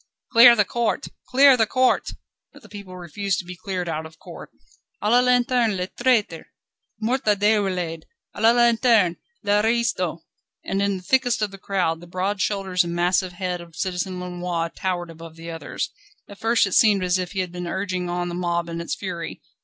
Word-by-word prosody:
"Clear 235 Hz, 0 st, +9 dB
the 205 Hz, -3 st, +3 dB
court! 235 Hz, +5 st, -2 dB, 0.2 s
Clear 270 Hz, +1 st, +6 dB
the 225 Hz, -3 st, +2 dB
court!" 255 Hz, +2 st, +2 dB, 0.4 s
But -, -, -17 dB
the 210 Hz, -, -15 dB
people 195 Hz, -2 st, -10 dB
refused 180 Hz, +2 st, -3 dB
to 180 Hz, -, -5 dB
be 180 Hz, +1 st, -8 dB
cleared 185 Hz, -1 st, -4 dB
out 160 Hz, -1 st, -3 dB
of 160 Hz, 0 st, -19 dB
court. -, -, -11 dB, 0.5 s
"A 210 Hz, -, 0 dB
la 245 Hz, -, +6 dB
lanterne 245 Hz, -3 st, +2 dB
les 180 Hz, +1 st, -3 dB
traîtres! 235 Hz, -9 st, 0 dB, 0.5 s
Mort 245 Hz, +4 st, 0 dB
à 210 Hz, -1 st, +4 dB
Déroulède. 190 Hz, -6 st, 0 dB, 0.3 s
A -, -, -8 dB
la 225 Hz, -, +6 dB
lanterne! 235 Hz, -6 st, +3 dB, 0.3 s
l'aristo!" 205 Hz, -5 st, +1 dB, 0.4 s
And 195 Hz, +1 st, -2 dB
in 200 Hz, -1 st, 0 dB
the 185 Hz, -, -11 dB
thickest 245 Hz, 0 st, +1 dB
of 205 Hz, -, -2 dB
the 195 Hz, -, -11 dB
crowd, 180 Hz, -5 st, -1 dB
the 175 Hz, -, -12 dB
broad 190 Hz, +3 st, -2 dB
shoulders 190 Hz, -3 st, 0 dB
and 170 Hz, 0 st, -4 dB
massive 180 Hz, +1 st, +1 dB
head 180 Hz, -1 st, -3 dB
of 170 Hz, -2 st, -14 dB
Citizen 180 Hz, +1 st, -3 dB
Lenoir 175 Hz, -2 st, -3 dB
towered 175 Hz, -2 st, -3 dB
above 165 Hz, 0 st, -12 dB
the 165 Hz, +1 st, -8 dB
others. 165 Hz, -1 st, -5 dB, 0.4 s
At 200 Hz, -, -13 dB
first 225 Hz, -3 st, +3 dB
it 195 Hz, -, -4 dB
seemed 205 Hz, -4 st, +4 dB
as 180 Hz, +1 st, +1 dB
if 180 Hz, +1 st, -4 dB
he 190 Hz, -, 0 dB
had 180 Hz, -2 st, -5 dB
been 180 Hz, 0 st, -6 dB
urging 185 Hz, -1 st, -3 dB
on 175 Hz, 0 st, -2 dB
the 175 Hz, -, -5 dB
mob 170 Hz, -1 st, -2 dB
in 170 Hz, 0 st, -4 dB
its 170 Hz, -, -3 dB
fury. 175 Hz, -4 st, -6 dB
185 Hz, 195 wpm, -23 LUFS, 175-215 Hz, 0.5 s, Clear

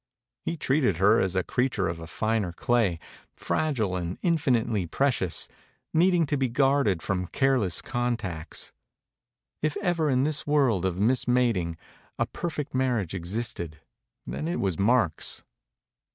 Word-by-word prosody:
He 170 Hz, -, -2 dB
treated 130 Hz, -, +1 dB
her 105 Hz, +5 st, +5 dB
as 95 Hz, -1 st, 0 dB
a 95 Hz, -, +2 dB
creature 125 Hz, -5 st, 0 dB
of 85 Hz, 0 st, -4 dB
a 80 Hz, -, -8 dB
finer 110 Hz, -1 st, -1 dB
clay, 110 Hz, -3 st, +1 dB, 0.4 s
fragile 120 Hz, -12 st, 0 dB
and 90 Hz, 0 st, -3 dB
infinitely 125 Hz, -, +1 dB
pre 140 Hz, -, +2 dB
cious, 90 Hz, -9 st, -1 dB, 0.5 s
needing 175 Hz, 0 st, +4 dB
to 145 Hz, 0 st, -1 dB
be 130 Hz, -2 st, +1 dB
guarded 135 Hz, -, +2 dB
from 90 Hz, -2 st, -1 dB
careless 125 Hz, -, +1 dB
con 120 Hz, -2 st, -1 dB
tacts. 85 Hz, -6 st, -5 dB, 0.9 s
If 155 Hz, -1 st, 0 dB
ever 175 Hz, -6 st, +1 dB
in 130 Hz, -1 st, +3 dB
this 150 Hz, 0 st, -1 dB
world 130 Hz, -11 st, +3 dB
of 90 Hz, -2 st, -1 dB
m 105 Hz, +5 st, +3 dB
ism 125 Hz, -1 st, +2 dB
a 125 Hz, -2 st, +3 dB
ting 85 Hz, -4 st, -3 dB, 0.4 s
a -, -, +1 dB
per 170 Hz, -, -4 dB
fect 150 Hz, -3 st, -5 dB
marriage 125 Hz, -9 st, 0 dB
existed, 85 Hz, -3 st, -3 dB, 0.5 s
then 155 Hz, -, -4 dB
it 175 Hz, -, -1 dB
was 95 Hz, -5 st, -1 dB
Mark's. 100 Hz, -6 st, +1 dB
120 Hz, 155 wpm, -27 LUFS, 90-140 Hz, 0.9 s, her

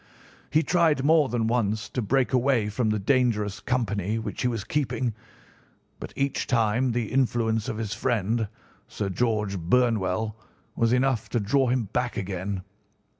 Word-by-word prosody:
He 155 Hz, +3 st, +3 dB
tried 160 Hz, -6 st, +2 dB
more 155 Hz, -2 st, +4 dB
than 115 Hz, -1 st, 0 dB
once 110 Hz, -2 st, 0 dB
to 125 Hz, -, -2 dB
break 130 Hz, +4 st, +1 dB
away 125 Hz, -4 st, +2 dB
from 110 Hz, +2 st, 0 dB
the 105 Hz, -, +1 dB
dangerous 105 Hz, -3 st, +1 dB
company 105 Hz, -4 st, -1 dB
which 110 Hz, -4 st, -4 dB
he -, -, +2 dB
was 115 Hz, -4 st, -2 dB
keeping, 130 Hz, -4 st, -1 dB, 0.9 s
but -, -, -7 dB
each 140 Hz, 0 st, -1 dB
time 120 Hz, +1 st, +2 dB
the 115 Hz, -2 st, -2 dB
influence 115 Hz, -4 st, +1 dB
of 110 Hz, -, -3 dB
his 110 Hz, -2 st, -3 dB
friend, 115 Hz, -1 st, 0 dB, 0.4 s
Sir 100 Hz, -, -3 dB
George 105 Hz, -2 st, 0 dB
Burnwell, 110 Hz, +1 st, +1 dB, 0.4 s
was 115 Hz, 0 st, +2 dB
enough 125 Hz, -2 st, +1 dB
to 120 Hz, -, 0 dB
draw 130 Hz, +6 st, +2 dB
him 125 Hz, 0 st, +1 dB
back 125 Hz, -1 st, -1 dB
again. 95 Hz, 0 st, -3 dB
115 Hz, 155 wpm, -26 LUFS, 105-125 Hz, 0.9 s, more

